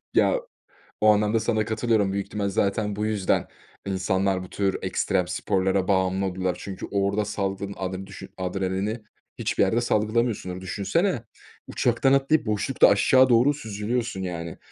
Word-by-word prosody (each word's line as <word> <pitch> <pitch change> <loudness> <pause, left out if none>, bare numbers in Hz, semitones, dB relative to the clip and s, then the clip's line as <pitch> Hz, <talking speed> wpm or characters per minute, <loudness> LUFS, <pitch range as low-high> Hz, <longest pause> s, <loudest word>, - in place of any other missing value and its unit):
Ya, - - +3 0.6
o 110 - +6
anlamda 105 +2 +2
sana 110 -1 0
katılıyorum 110 -3 +1
büyük 100 0 -2
ihtimal, 100 -2 -2
zaten 100 +1 0
bu 105 +1 -2
yüzden 105 -3 0 0.4
insanlar 95 0 0
bu 90 - -11
tür 100 -1 -1
ekstrem 90 -1 0
sporlara 95 0 0
bağımlı 95 0 +1
oluyorlar. 95 -1 -1
Çünkü 95 -2 -6
orada 100 +1 +1
saldığın 100 -1 -3
adren 95 0 -4
düşün - - -10
adrenalini 95 +4 -2 0.4
hiçbir - - +1
yerde 110 +5 +2
salgılamıyorsundur. 110 -4 0
Düşünsene, 115 - -1 0.4
uçaktan 135 - +2
atlayıp 140 +1 +2
boşlukta 110 +5 +3
aşağı 130 +6 +5
doğru 125 +4 +5
süzülüyorsun 110 -3 -3
yani. 85 -3 -5
100 Hz, 140 wpm, -25 LUFS, 95-110 Hz, 0.6 s, o